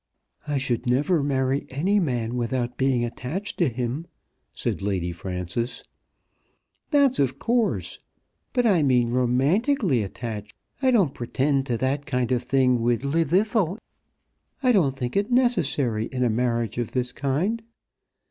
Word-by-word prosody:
"I 145 Hz, -1 st, 0 dB
should 130 Hz, -2 st, -1 dB
never 145 Hz, +7 st, +2 dB
marry 135 Hz, 0 st, 0 dB
any 185 Hz, +10 st, +1 dB
man 120 Hz, -, -1 dB
without 120 Hz, 0 st, -1 dB
being 130 Hz, -3 st, +1 dB
attached 140 Hz, -, -5 dB
to 170 Hz, -6 st, +3 dB
him," 125 Hz, +7 st, -3 dB, 0.4 s
said -, -, -3 dB
Lady 95 Hz, -3 st, -1 dB
Frances. 90 Hz, +6 st, -4 dB, 1.1 s
"That's 280 Hz, -4 st, +3 dB
of 130 Hz, -1 st, +1 dB
course! 235 Hz, -, 0 dB, 0.5 s
But 245 Hz, -2 st, +1 dB
I 190 Hz, -7 st, +4 dB
mean 125 Hz, -4 st, +3 dB
romantically 135 Hz, -, +2 dB
attached. 105 Hz, 0 st, -6 dB, 0.3 s
I 265 Hz, -, +3 dB
don't 195 Hz, -, +3 dB
pretend 135 Hz, +3 st, 0 dB
to 120 Hz, -, 0 dB
that 135 Hz, +4 st, -1 dB
kind 125 Hz, -3 st, 0 dB
of 125 Hz, -2 st, +2 dB
thing 125 Hz, -1 st, +2 dB
with 120 Hz, +1 st, +1 dB
Llwddythlw. 180 Hz, +6 st, +1 dB, 0.9 s
I 255 Hz, -, +5 dB
don't 150 Hz, -, +2 dB
think 125 Hz, -2 st, -3 dB
it 200 Hz, +3 st, +1 dB
necessary 150 Hz, -, +2 dB
in 125 Hz, -1 st, -2 dB
a 120 Hz, -, +2 dB
marriage 120 Hz, -1 st, -1 dB
of 120 Hz, -, -3 dB
this 125 Hz, -1 st, -1 dB
kind. 150 Hz, -, -1 dB
130 Hz, 140 wpm, -25 LUFS, 120-170 Hz, 1.1 s, I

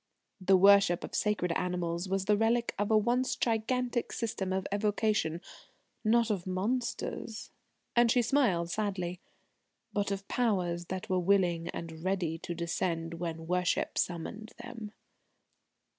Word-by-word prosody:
The 190 Hz, +1 st, +6 dB
worship 195 Hz, -2 st, +6 dB
of -, -, -7 dB
sacred 205 Hz, -4 st, +1 dB
animals 180 Hz, 0 st, -1 dB
was 195 Hz, 0 st, 0 dB
the 210 Hz, -, +4 dB
relic 230 Hz, +2 st, +1 dB
of 205 Hz, -, 0 dB
a 220 Hz, -, +5 dB
once 240 Hz, +4 st, +1 dB
gigantic 240 Hz, +2 st, 0 dB
system 205 Hz, -5 st, -2 dB
of 190 Hz, 0 st, -1 dB
evocation 205 Hz, -5 st, +1 dB, 0.6 s
not 230 Hz, 0 st, +3 dB
of 190 Hz, -3 st, -2 dB
monsters," 220 Hz, +3 st, -2 dB, 0.4 s
and 240 Hz, -1 st, +5 dB
she 245 Hz, +1 st, +4 dB
smiled 210 Hz, -10 st, +2 dB
sadly, 185 Hz, -4 st, -2 dB, 0.7 s
"but 205 Hz, -1 st, 0 dB
of 200 Hz, 0 st, -4 dB
Powers 180 Hz, -8 st, 0 dB
that 185 Hz, +1 st, -5 dB
were 185 Hz, -1 st, +1 dB
willing 175 Hz, -3 st, +2 dB
and 165 Hz, -1 st, -6 dB
ready 180 Hz, -4 st, -1 dB
to 175 Hz, -, -5 dB
descend 165 Hz, -1 st, -2 dB
when 165 Hz, -1 st, -4 dB
worship 180 Hz, +1 st, 0 dB
summoned 195 Hz, +6 st, -3 dB
them." 235 Hz, -3 st, -8 dB
195 Hz, 135 wpm, -31 LUFS, 175-220 Hz, 0.7 s, The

